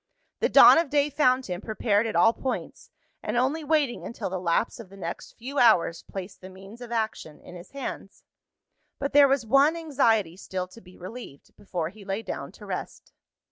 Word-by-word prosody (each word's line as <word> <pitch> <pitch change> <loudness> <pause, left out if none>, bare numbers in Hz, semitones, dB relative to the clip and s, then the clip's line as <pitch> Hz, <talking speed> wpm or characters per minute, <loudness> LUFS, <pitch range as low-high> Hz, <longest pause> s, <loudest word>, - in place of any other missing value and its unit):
The - - +1
dawn - - +8
of 330 - -1
day 290 +1 +1
found 255 -2 +2
him 180 0 -5
prepared 215 0 0
at 220 - -4
all 225 0 +5
points, 260 +1 -5 0.3
and - - -3
only 275 +6 0
waiting 295 -5 0
until 230 - -5
the 190 - -3
lapse 175 +7 0
of 220 -5 -10
the 195 - -14
next 170 -3 -7
few 270 +5 -5
hours 175 -8 +4
placed 195 0 -9
the 185 - -10
means 195 +5 -13
of 240 -1 -9
action 220 -9 -3
in - - -14
his 175 0 -11
hands. 275 -1 -7 0.7
But 280 +1 -3
there 285 0 +7
was 270 -3 +1
one 275 +7 +4
anxiety 225 - +1
still 185 -1 -5
to 230 +5 -15
be 180 0 -17
relieved, 185 - -11
before 175 -5 -4
he 205 +3 -14
lay 195 +3 -4
down - - -6
to - - -13
rest. - - -7
225 Hz, 195 wpm, -26 LUFS, 185-270 Hz, 0.7 s, dawn